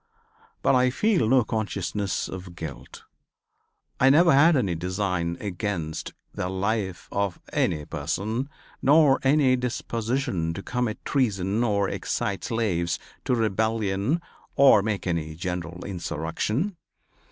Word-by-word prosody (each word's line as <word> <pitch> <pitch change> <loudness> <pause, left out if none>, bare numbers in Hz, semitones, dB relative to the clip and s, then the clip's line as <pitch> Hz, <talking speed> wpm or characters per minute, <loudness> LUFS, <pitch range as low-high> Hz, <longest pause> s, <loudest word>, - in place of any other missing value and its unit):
But - - +4
I 125 0 +4
feel 175 - +2
no 130 -1 +5
consciousness 105 -2 -2
of 90 -1 -8
guilt. 70 -7 -8 1.0
I 130 - +6
never 165 +4 +6
had 155 +4 +6
any 100 -9 +1
design 90 -1 -2
against 90 -5 -4 0.2
the 90 - -3
life 95 -1 -2
of 100 -2 -1
any 75 -1 0
person, 110 - -3 0.3
nor 145 0 +5
any 135 -1 +4
disposition 115 -7 -2
to 100 - -6
commit 125 -3 -2
treason 105 -5 +1
or 100 -4 +1
excite 100 +1 -2
slaves 90 -8 0 0.3
to 125 - +2
rebellion 110 - 0 0.4
or 135 -7 +7
make 105 -1 -2
any 80 -3 -2
general 90 0 -5
insurrection. 100 - -2
105 Hz, 120 wpm, -25 LUFS, 90-125 Hz, 1.0 s, or